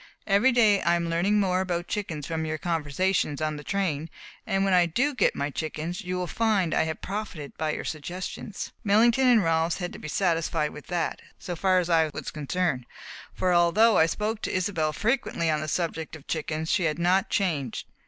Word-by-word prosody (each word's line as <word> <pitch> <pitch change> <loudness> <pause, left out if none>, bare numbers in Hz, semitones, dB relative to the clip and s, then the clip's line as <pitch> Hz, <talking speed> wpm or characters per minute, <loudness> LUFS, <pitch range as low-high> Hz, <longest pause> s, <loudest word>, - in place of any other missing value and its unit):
Every 210 +6 +4
day 220 -5 +4
I 170 +2 +3
am 170 -1 -1
learning 195 +5 +2
more 185 -2 +2
about 175 -2 -2
chickens 170 -9 -3
from 160 -1 -2
your 155 0 -2
conversations 165 -1 0
on 155 -1 -1
the 150 - -8
train, 165 -6 -1 0.4
and 195 0 +1
when 195 - +2
I 175 -1 +5
do 265 - +1
get 255 - +2
my 140 +1 -2
chickens 160 +5 -4
you 180 -1 -3
will 180 - -1
find 200 -3 +1
I - - +2
have 160 0 -5
profited 195 -8 -5
by 155 -1 -1
your - - -5
suggestions." 180 +6 -5
Millington 230 +5 +4
and 235 -4 +5
Rolfs 165 0 +1
had 175 -2 -4
to - - -9
be - - -7
satisfied 165 -3 0
with 150 - -11
that, 175 -2 -2 0.2
so 180 -3 -5
far 185 +2 +2
as 180 -2 +1
I 165 -2 +3
was - - -5
concerned, 150 -3 -2 0.4
for 185 -1 0
although 185 +7 +5
I 160 - +5
spoke 215 +5 -2
to - - -2
Isobel 180 -4 0
frequently 210 - 0
on 155 -1 0
the 155 - -4
subject 160 -1 -2
of 150 - -13
chickens 160 0 -2
she 180 - +2
had 155 -1 0
not 180 +3 +2
changed. 150 - -1
175 Hz, 200 wpm, -26 LUFS, 155-195 Hz, 0.4 s, I